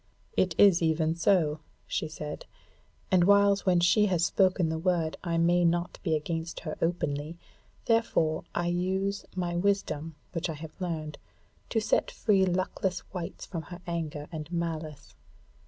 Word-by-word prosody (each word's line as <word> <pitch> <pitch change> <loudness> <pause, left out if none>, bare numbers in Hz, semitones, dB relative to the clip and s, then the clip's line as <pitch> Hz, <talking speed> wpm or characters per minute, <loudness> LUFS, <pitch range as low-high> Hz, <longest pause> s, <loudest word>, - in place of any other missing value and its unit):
"It 180 -4 +2
is 195 -4 +6
even 160 0 +2
so," 165 -3 +2 0.3
she - - -2
said, 150 -1 -7 0.6
"and 185 -2 +5
whiles 200 +1 +4
when 180 -1 +5
she 210 +5 +4
has 175 -3 +2
spoken 185 -2 +2
the 160 0 -2
word 165 -2 0
I 170 -2 -1
may 175 +1 +3
not 170 +1 0
be 160 -4 +1
against 165 +2 -3
her 155 -3 -4
openly, 160 -2 -1 0.5
therefore 170 -9 +2
I 175 - 0
use 190 +3 -1
my 175 -2 -2
wisdom 175 -5 0 0.2
which 170 -1 -2
I 160 - -3
have 155 +1 -9
learned, 160 -4 -4 0.5
to 225 - +1
set 215 0 +1
free 195 -4 +2
luckless 185 0 -1
wights 180 -3 -5
from 170 -4 -5
her 175 -1 -8
anger 155 -3 -4
and 155 0 -6
malice. 160 -4 -4
170 Hz, 155 wpm, -29 LUFS, 160-185 Hz, 0.6 s, is